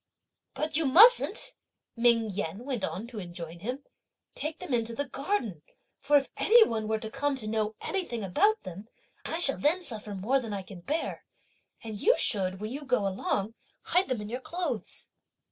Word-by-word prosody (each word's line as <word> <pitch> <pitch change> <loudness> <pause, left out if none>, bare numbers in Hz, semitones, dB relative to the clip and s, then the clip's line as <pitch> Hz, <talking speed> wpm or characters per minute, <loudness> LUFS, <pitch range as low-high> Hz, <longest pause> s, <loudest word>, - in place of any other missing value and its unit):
"But 300 +2 0
you 320 -3 +1
mustn't," 485 - +6 0.4
Ming 230 -2 +3
Yen 195 +3 -4
went 255 -7 -3
on 205 - -3
to 235 -2 -8
enjoin 175 -2 -8
him, 250 +9 -4 0.5
"take 310 +1 -4
them 365 -8 -5
into 230 -1 0
the 285 +1 -2
garden; 270 - -2 0.4
for 290 +1 +4
if 275 - -1
any 465 +1 +7
one 220 -1 -2
were 220 0 +1
to 220 0 -7
come 290 +2 0
to 250 -5 -6
know 215 0 -1
anything 295 - -3
about 410 - +2
them, 185 +4 -8 0.4
I 325 - -1
shall 295 -6 +2
then 335 +6 +2
suffer 215 -8 -5
more 230 +9 +1
than 225 -5 -5
I 195 -1 -4
can 185 -1 -11
bear; 305 - -2 0.6
and 220 -2 -6
you 480 - +4
should, 190 -3 +1
when 215 +2 -5
you 285 +3 -5
go 250 -7 +1
along, 195 +2 -2 0.3
hide 360 -2 +2
them 250 -4 -1
in 210 - -6
your 250 +2 -4
clothes!" 350 +5 -4
235 Hz, 185 wpm, -29 LUFS, 210-290 Hz, 0.6 s, any